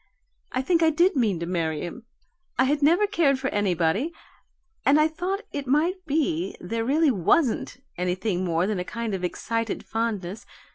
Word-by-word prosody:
I 255 - -1
think 335 +3 +2
I 325 - +5
did 345 +5 +3
mean 215 -9 +1
to - - -1
marry 165 -3 -1
him. 230 +7 -7 0.5
I 260 - +5
had 290 +3 +1
never 340 +8 +4
cared 335 -10 +2
for 265 +1 -2
anybody, 195 - +1 0.7
and 285 +2 +5
I 305 - +5
thought 360 +6 -3
it 285 -2 -4
might 335 +8 +1
be 235 - 0
there 225 +6 -3
really 295 +4 +3
WASN'T 245 - +1 0.2
anything 180 +1 -1
more 170 -1 +1
than 205 -2 -1
a - - -1
kind 230 +2 -4
of 185 -1 -3
excited 230 +5 -2
fondness. 215 -4 -3
235 Hz, 175 wpm, -25 LUFS, 185-305 Hz, 0.7 s, I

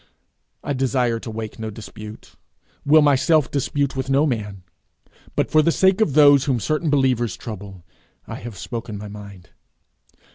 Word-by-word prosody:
I 145 - -2
desire 125 -3 0
to 115 - -8
wake 110 0 -6
no 110 0 -4
dispute, 105 0 -11 0.5
will 155 +1 +5
myself 145 0 +3
dispute 140 0 -1
with 130 0 -3
no 140 +3 +3
man, 105 - -3 0.7
but - - 0
for 155 - +5
the 165 - +2
sake 190 +4 +3
of 160 -10 +2
those 145 -2 +6
whom 130 -5 0
certain 155 - -1
believers 130 -6 +1
trouble, 100 -5 -9 0.4
I - - -7
have 115 -2 -9
spoken 115 -3 -6
my 105 0 -8
mind. 100 -3 -11
125 Hz, 155 wpm, -21 LUFS, 105-145 Hz, 0.7 s, those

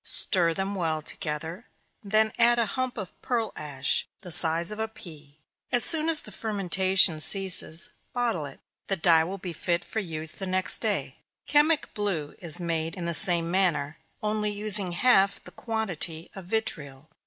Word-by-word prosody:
Stir 170 -3 +1
them 195 +1 -4
well 160 -5 -3
together, 160 +8 -6 0.4
then 215 +2 +1
add 240 0 +4
a 230 -3 -1
lump 255 -1 -4
of 195 -4 -7
pearl 230 -4 -3
ash, 140 -2 -2
of - - -45
the 180 - -9
size 165 +2 +7
of 210 - -8
a 220 - -2
pea 155 -9 -12 0.3
as 245 - +4
soon 320 0 +4
as 315 -2 +3
the 210 - -11
fermentation 190 -4 +2
ceases, 170 -1 -1 0.2
bottle 235 -11 -2
it 135 - -14 0.3
the 195 - -1
dye 165 -2 +3
will 185 +4 -6
be 180 -2 -8
fit 170 +2 -3
for 220 - -5
use 160 -5 -5
the 190 - -7
next 185 0 0
day. - - -2 0.3
Chemic 295 +1 +1
blue 180 -8 -4
is 170 -2 -3
made 165 -1 -3
in 180 -3 -7
the 170 - -2
same 170 0 +7
manner, 160 -6 0 0.2
only 210 0 -1
using 205 -3 +2
half 195 -1 +2
the - - -13
quantity 180 -8 -6
of 190 -2 -11
vitriol. 150 -10 -4
185 Hz, 175 wpm, -25 LUFS, 160-215 Hz, 0.4 s, size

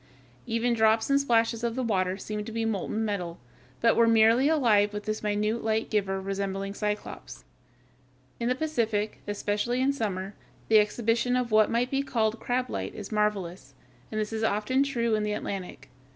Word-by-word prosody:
Even 230 +1 +1
drops 220 +2 +3
and 280 0 +4
splashes 230 -3 +1
of 235 -1 -1
the 260 - -1
water 190 -4 0
seemed 210 +1 -5
to - - -6
be 225 0 -2
molten 220 +1 -1
metal, 180 -5 -3 0.4
but 230 -1 +4
were 230 0 +4
merely 230 +5 +5
alive 215 -9 +3
with 210 0 -4
this 215 +1 -3
minute 210 +2 -1
light 220 0 -1
giver 195 -3 0
resembling 195 0 -3
Cyclops. 210 0 -5 0.9
In 235 0 0
the 250 - +2
Pacific, 225 -8 -1
especially 205 +4 -1
in 270 +2 +2
summer, 200 -6 -3 0.4
the 220 -1 +7
exhibition 230 +3 +1
of 250 -2 -1
what 215 0 +5
might 240 +2 0
be 275 0 +1
called 225 -4 0
"crab 250 +1 -1
light" - - -5
is - - -8
marvelous, 190 -10 -2 0.4
and 215 - -2
this 215 +1 -2
is 220 - -2
often 220 +5 +1
true 235 -5 0
in 215 - +2
the 210 0 -1
Atlantic. 195 -3 -5
220 Hz, 180 wpm, -27 LUFS, 205-235 Hz, 0.9 s, the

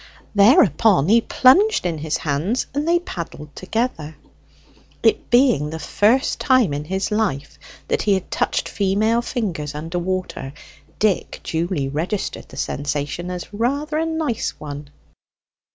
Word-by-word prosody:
Thereupon 200 - +5
he 230 +2 +6
plunged 375 - +4
in 165 -3 -1
his 155 0 -1
hands, 160 - -1
and 290 +3 -2
they 340 +1 +4
paddled 165 - -7
together. 185 -7 -3 0.9
It 225 - +2
being 240 - +3
the 160 - -5
first 215 - +1
time 255 - +3
in 145 +1 -4
his 190 +5 -2
life 190 -11 -2 0.3
that - - 0
he 205 -2 +2
had 190 -1 -5
touched - - 0
female 210 +4 +1
fingers 180 - -3
under 165 +4 -3
water, 180 -6 -4 0.4
Dick 210 -3 0
duly 165 -3 -2
registered 165 +9 -3
the - - -12
sensation 145 +4 -3
as 180 +2 -6
rather 285 +8 -1
a 325 - 0
nice 320 -8 -2
one. 145 -1 -7
190 Hz, 135 wpm, -21 LUFS, 150-235 Hz, 0.9 s, he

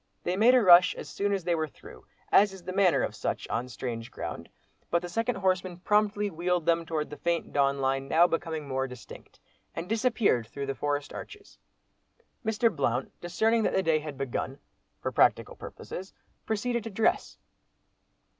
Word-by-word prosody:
They 180 - -1
made 230 +6 +5
a 250 - +5
rush 180 -1 +7
as - - -8
soon 205 0 -2
as 195 -2 -1
they 175 0 +1
were 160 -1 0
through, - - -15 0.2
as 200 -1 +5
is 190 -2 -11
the 185 +1 -5
manner 190 -2 +3
of - - -2
such, - - -3
on 120 +2 -2
strange 120 -1 -5
ground—but 85 - -5
the 175 - -6
second 230 +7 -1
horseman 185 -2 0
promptly 210 +2 +1
"wheeled" 175 0 -1
them 170 -1 +1
towards 155 -2 -2
the 150 - -7
faint 170 -1 -2
dawn 140 -1 +2
line 135 0 0
now 165 +4 +5
becoming 165 -3 -2
more 135 0 -1
distinct, 125 -2 -12 0.4
and 165 +2 -4
disappeared 220 - +1
through 140 +5 -5
the 135 - -2
forest 145 +1 -2
arches. 410 0 -10 0.8
Mr. 220 -1 +1
Blount 130 -3 -1
discerning 220 +6 +1
that - - 0
the 190 - +2
day 160 -2 +2
had 150 -2 -7
begun, 135 0 -3 0.5
for - - -1
practical - - +2
purposes, 190 +2 -9 0.3
proceeded 235 +2 -1
to - - -4
dress. 220 +2 0
175 Hz, 175 wpm, -28 LUFS, 140-205 Hz, 0.8 s, rush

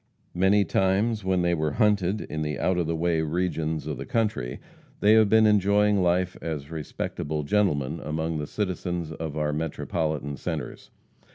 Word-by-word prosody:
Many 95 +3 +3
times 100 +4 +1
when 95 -1 +1
they 85 0 +2
were 80 -3 0
hunted 105 -2 +2
in 80 - -5
the 75 -2 -2
out 90 +5 +1
of 85 - 0
the 85 - -1
way 80 0 +1
regions 80 -1 -1
of 75 -4 -4
the - - -5
country, 110 - -1 0.4
they 105 +1 +5
have 110 -2 +5
been 110 +1 +5
enjoying 105 -1 +3
life 90 +1 +1
as 75 -2 -5
respectable 75 -1 -4
gentlemen 75 -5 +1
among 80 +1 -2
the 75 - -4
citizens 90 -4 -3
of 80 -1 -5
our 75 -1 0
Metropolitan 75 -2 -2
centers. - - -5
85 Hz, 165 wpm, -26 LUFS, 75-100 Hz, 0.4 s, they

